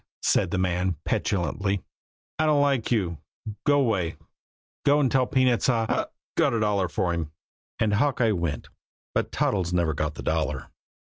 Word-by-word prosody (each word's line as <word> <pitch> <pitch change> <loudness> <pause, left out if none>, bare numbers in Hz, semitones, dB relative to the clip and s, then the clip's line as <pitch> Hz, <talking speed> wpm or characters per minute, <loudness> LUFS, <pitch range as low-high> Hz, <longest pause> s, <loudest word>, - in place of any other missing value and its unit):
said - - +2
the 95 - -1
man 90 0 0
petulantly. 95 +2 -1 0.6
"I 155 - +3
don't 145 -2 +4
like 135 -5 +1
you. 90 -9 0 0.5
Go 145 -1 +5
'way! 95 -9 0 0.7
Go 145 0 +4
an' 135 -3 +3
tell 130 -1 +2
peanuts 130 -1 +2
I 115 -3 +2
hic! - - -1 0.3
got - - +3
a - - +1
dollar 105 -3 +1
for 85 +1 -1
him." 80 -3 -3 0.5
And 110 -2 +1
Hawkeye 125 0 +2
went 85 -6 -2 0.4
but - - -1
Toddles 90 -4 0
never 85 -3 +2
got 75 +1 -2
the - - -7
dollar. 75 -4 -1
100 Hz, 160 wpm, -26 LUFS, 85-125 Hz, 0.7 s, Go